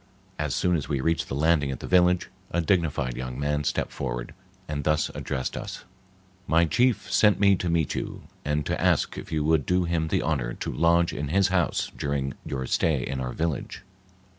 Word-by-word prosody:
As 75 -2 -1
soon 90 -1 +2
as 75 - -3
we 70 - 0
reached 80 +4 0
the - - -4
landing 75 -1 +2
at 65 - -4
the - - -7
village, 90 -1 +3 0.2
a 85 - -1
dignified 80 -8 +1
young 65 +1 -5
man 75 +1 0
stepped - - -1
forward - - -4 0.3
and 75 -1 -3
thus 75 +1 +1
addressed 65 -1 -3
us:— - - -6 0.6
"My 85 +1 +4
chief 120 +4 +1
sent 105 -1 +4
me 100 -1 +5
to 90 - -2
meet 85 -3 +1
you, - - -5 0.2
and 75 0 -1
to - - -2
ask - - +2
if - - -10
you 75 -1 0
would 80 -1 +3
do 90 0 +2
him 85 -2 0
the - - 0
honor - - -1
to - - -4
lodge 85 +1 +3
in 75 - -3
his 95 +5 +3
house 90 -3 0
during 70 -2 -2
your 65 -2 -3
stay 70 -1 +1
in 70 0 -3
our 65 -1 -3
village?" 80 +1 -3
75 Hz, 200 wpm, -26 LUFS, 70-85 Hz, 0.6 s, me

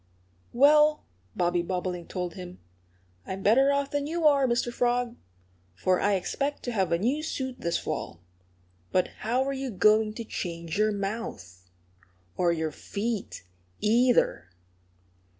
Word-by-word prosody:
"Well," 300 +4 +5 0.3
Bobby 175 0 +1
Bobolink 180 -1 -3
told 180 -2 -3
him, 180 0 -9 0.7
"I'm 190 +1 -5
better 265 +7 +5
off 280 0 0
than 285 0 -1
you 330 +1 -2
are, 280 -3 +5
Mr. 240 0 0
Frog. 245 0 0 0.6
For 185 - +1
I 205 0 +3
expect 280 +10 -2
to 245 - -3
have 195 -5 0
a 170 - +3
new 250 - 0
suit 260 -5 -4
this 170 - 0
fall. 85 - -5 0.7
But 185 - +2
how 245 +4 +1
are 275 +1 -2
you 270 -1 -4
going 215 +1 +3
to 230 - -5
change 170 -6 -5
your 215 0 +3
mouth 195 - -5 0.7
or 175 -1 +2
your 160 -2 -1
feet, 210 - -4 0.4
either?" 225 - +2
215 Hz, 140 wpm, -27 LUFS, 180-260 Hz, 0.7 s, Well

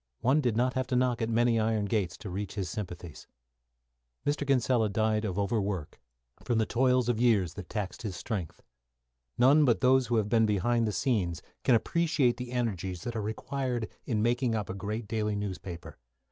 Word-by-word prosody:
One 135 +5 +3
did 120 -5 0
not 125 +1 +2
have 130 -1 -1
to 130 - -1
knock 125 -1 +1
at 115 - 0
many 115 0 +3
iron 110 -1 +1
gates 100 -4 -1
to 100 - -8
reach 100 +2 -4
his 95 -4 -3
sympathies. 90 -6 -7 1.0
Mr. 145 0 0
Kinsella 125 -4 +2
died 110 +1 +1
of 95 -3 -3
overwork, 100 -5 -2 0.4
from 120 -3 0
the 110 - +2
toil 125 +1 +2
of 120 -2 +1
years 100 -9 +3
that 100 -4 -9
taxed 105 -4 -4
his 105 -6 -4
strength. 95 -8 -5 0.7
None 140 +5 +6
but 120 -5 +3
those 130 -1 +4
who 120 - 0
have 110 -2 +2
been 115 0 +3
behind 115 +3 +1
the - - 0
scenes 95 - -1 0.2
can 125 - +5
appreciate 155 -1 +2
the 125 -1 -6
energies 95 -8 -2
that 120 - -4
are 110 - -1
required 120 +2 -3 0.2
in 110 -3 0
making 120 0 +1
up 105 -3 -2
a - - -4
great 105 +3 -4
daily 105 -1 -1
newspaper. 90 -7 -6
110 Hz, 190 wpm, -29 LUFS, 100-125 Hz, 1.0 s, None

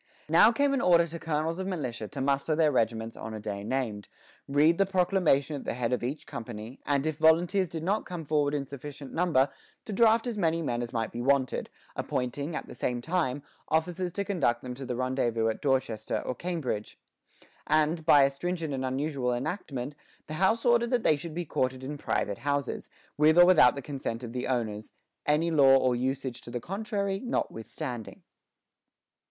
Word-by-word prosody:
Now 175 +8 +7
came 280 +4 +2
an 270 - +1
order 170 -1 +5
to 170 0 -7
colonels 160 +1 -1
of 190 - -3
militia 125 - -3
to 140 +2 -6
muster 140 +3 +1
their 155 -1 +3
regiments 115 -2 0
on 110 0 -6
a - - -5
day 100 -1 -5
named, 110 -4 -2 0.4
read 150 +5 +3
the 195 - +5
proclamation 180 -6 +2
at 140 - -6
the - - -3
head 125 0 -1
of 125 - -1
each 135 +5 -3
company, 115 +2 -7
and 140 0 +1
if 155 -1 -2
volunteers 170 +4 +4
did 160 0 -5
not 200 +5 0
come 175 -3 -6
forward 145 -1 +1
in 140 -1 -2
sufficient 140 0 -9
number, 160 -6 +3 0.4
to 215 - -5
draft 225 +2 +4
as 235 -4 -3
many 165 -2 +1
men 120 -4 -1
as 120 -1 -4
might 115 -2 -2
be 120 - -5
wanted, 135 0 +1 0.3
appointing, 140 +5 -3
at - - -4
the - - -9
same 125 -1 -2
time, 145 -2 -1 0.2
officers 175 +3 0
to 200 - -2
conduct 145 -12 0
them 125 -1 -5
to 135 +1 -8
the 125 - -2
rendezvous 120 -3 0
at 110 - -4
Dorchester 130 -6 0
or - - -1
Cambridge; 150 -10 -4 0.7
and, 155 +1 +2
by 150 -3 +7
a 135 - +3
stringent 165 +1 -3
and 130 -1 -2
unusual 130 -1 -1
enactment, 130 0 -3 0.3
the 155 - -7
House 220 +5 +3
ordered 235 -1 +4
that 245 -2 +1
they 155 - +4
should 155 +2 -7
be 175 0 -3
quartered 130 -2 -1
in 145 +2 -5
private 100 -5 -1
houses, 140 +1 -2 0.3
with 155 +2 +5
or 175 - +9
without 175 -9 +6
the 140 - -6
consent 130 -4 -4
of 115 -1 -6
the 125 - -3
owners, 110 -4 -2 0.3
"any 155 +3 +2
law 135 -4 +6
or 130 -2 +2
usage 130 0 -2
to - - -11
the 120 - -3
contrary 200 - -2
notwithstanding." 125 - -4
145 Hz, 190 wpm, -28 LUFS, 125-170 Hz, 0.7 s, or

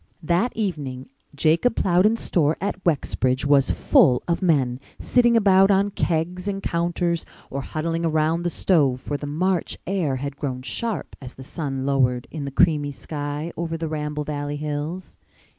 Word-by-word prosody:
That 175 +10 +1
evening 145 - -3 0.3
Jacob 165 - +2
Plowden's 195 +5 +3
store 155 -2 +1
at 195 -1 -3
Wexbridge 130 -5 0
was 140 -2 +4
full 125 -2 +4
of 170 +2 0
men, 135 -8 +2 0.2
sitting 240 -2 +3
about 195 -2 +5
on 200 +1 +3
kegs 175 +2 -1
and 195 -1 -3
counters 170 0 -1 0.3
or 140 - -3
huddling 165 +4 -3
around 160 +1 +1
the 175 - 0
stove, 145 -8 +2
for 145 - -4
the 145 0 -4
March 180 +4 -1
air 175 -8 0
had 140 +1 -5
grown 130 -4 -4
sharp 220 - -3
as 125 -2 -9
the 130 - -10
sun 135 -2 -4
lowered 125 -3 +1
in 150 -3 -5
the - - -3
creamy 145 +1 +2
sky 145 +3 -5
over 165 -1 -3
the 165 0 -3
Ramble 150 -1 -3
Valley 145 0 -4
hills. 150 +4 -5
155 Hz, 160 wpm, -23 LUFS, 140-180 Hz, 0.3 s, about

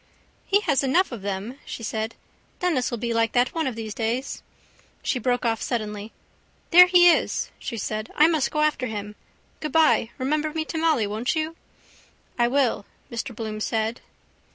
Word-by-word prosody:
—He 405 +1 +3
has 285 -9 +2
enough 285 +7 +2
of 235 -5 -6
them, 200 +7 -4
she 230 - -7
said. 220 +1 -3 0.4
Denis 310 -9 +1
will 240 - -3
be 235 +1 -2
like 230 0 +1
that 245 0 +2
one 325 -4 -1
of 255 - -3
these 220 -2 -5
days. 235 +5 -2 0.6
She 255 - 0
broke 245 +1 0
off 225 -1 0
suddenly. 215 -2 -3 0.6
—There 360 +2 +9
he 355 -1 +7
is, - - 0
she 230 - -5
said. 215 +1 -4
I 300 - +6
must 320 -4 +2
go 300 - -1
after 300 -4 +1
him. 210 -2 -6 0.4
Goodbye. 305 -6 +3
Remember 300 +3 -1
me 315 -1 -1
to 320 - -4
Molly, 315 -9 +2
won't 215 +7 -1
you? 315 +1 -2 0.8
—I 240 - +4
will, 245 -5 +1 0.2
Mr 235 0 -4
Bloom 215 -1 -5
said. 220 +1 -1
245 Hz, 175 wpm, -24 LUFS, 220-305 Hz, 0.8 s, There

